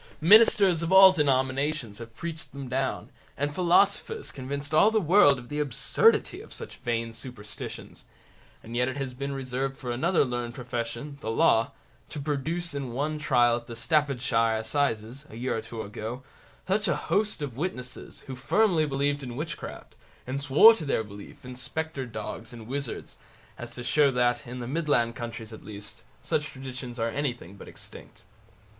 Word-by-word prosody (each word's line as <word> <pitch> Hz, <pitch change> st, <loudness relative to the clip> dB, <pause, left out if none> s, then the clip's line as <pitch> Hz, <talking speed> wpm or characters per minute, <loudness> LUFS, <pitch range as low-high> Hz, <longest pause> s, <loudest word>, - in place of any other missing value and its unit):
Ministers 195 Hz, -1 st, +6 dB
of 170 Hz, +1 st, -2 dB
all 190 Hz, 0 st, +10 dB
denominations 135 Hz, -, 0 dB
have 115 Hz, -1 st, -10 dB
preached 165 Hz, +4 st, -6 dB
them 140 Hz, -1 st, -6 dB
down, 130 Hz, +1 st, -2 dB, 0.3 s
and 145 Hz, +1 st, -1 dB
philosophers 200 Hz, -, +2 dB
convinced 140 Hz, +2 st, -5 dB
all 200 Hz, +7 st, +6 dB
the 220 Hz, 0 st, +2 dB
world 170 Hz, -6 st, +5 dB
of 120 Hz, -1 st, -10 dB
the 150 Hz, +3 st, -4 dB
absurdity 145 Hz, -6 st, +2 dB
of -, -, -14 dB
such -, -, -8 dB
vain 115 Hz, -1 st, -2 dB
superstitions; 115 Hz, -3 st, -8 dB, 0.6 s
and 115 Hz, +1 st, -8 dB
yet 125 Hz, +1 st, +2 dB
it 130 Hz, +2 st, -3 dB
has 135 Hz, -2 st, -3 dB
been 140 Hz, +2 st, -4 dB
reserved 135 Hz, 0 st, -3 dB
for 125 Hz, -, -5 dB
another 160 Hz, +6 st, +2 dB
learned 120 Hz, -1 st, -4 dB
profession, 120 Hz, +3 st, -5 dB
the -, -, -4 dB
Law, 115 Hz, +2 st, +3 dB, 0.4 s
to 150 Hz, -, -6 dB
produce 155 Hz, +4 st, -2 dB
in 135 Hz, -4 st, -4 dB
one 150 Hz, +4 st, -2 dB
trial 120 Hz, -5 st, +3 dB
at 120 Hz, -, -10 dB
the 115 Hz, -, -7 dB
Staffordshire 125 Hz, -5 st, +1 dB
assizes, 115 Hz, +2 st, -1 dB
a -, -, -11 dB
year 125 Hz, +3 st, -2 dB
or 110 Hz, -, -2 dB
two 115 Hz, 0 st, -6 dB
ago, 110 Hz, +5 st, -6 dB, 0.4 s
such 200 Hz, +2 st, +1 dB
a 170 Hz, -, +2 dB
host 210 Hz, -7 st, 0 dB
of 135 Hz, -5 st, -5 dB
witnesses, 125 Hz, -5 st, -5 dB
who 130 Hz, -, -6 dB
firmly 160 Hz, +4 st, +2 dB
believed 145 Hz, +1 st, 0 dB
in 125 Hz, -3 st, -6 dB
witchcraft, 155 Hz, +2 st, -6 dB, 0.3 s
and 130 Hz, +2 st, -3 dB
swore 145 Hz, +11 st, +8 dB
to 200 Hz, -, -5 dB
their 140 Hz, -6 st, 0 dB
belief 100 Hz, +3 st, -12 dB
in 125 Hz, 0 st, -8 dB
spectre 135 Hz, +2 st, -4 dB
dogs 110 Hz, +3 st, -6 dB
and 115 Hz, -2 st, -10 dB
wizards, 135 Hz, +1 st, -5 dB, 0.4 s
as 120 Hz, -, -7 dB
to 120 Hz, 0 st, -8 dB
show 140 Hz, +4 st, +4 dB
that, 125 Hz, -1 st, +1 dB
in 125 Hz, +1 st, -6 dB
the 120 Hz, -, -5 dB
Midland 135 Hz, -6 st, +1 dB
counties 115 Hz, -2 st, -6 dB
at 110 Hz, -, -11 dB
least, 105 Hz, +1 st, -8 dB, 0.2 s
such 150 Hz, -, 0 dB
traditions 130 Hz, -3 st, -7 dB
are 115 Hz, 0 st, 0 dB
anything 120 Hz, -, -3 dB
but -, -, -12 dB
extinct. -, -, -10 dB
130 Hz, 175 wpm, -27 LUFS, 120-150 Hz, 0.6 s, all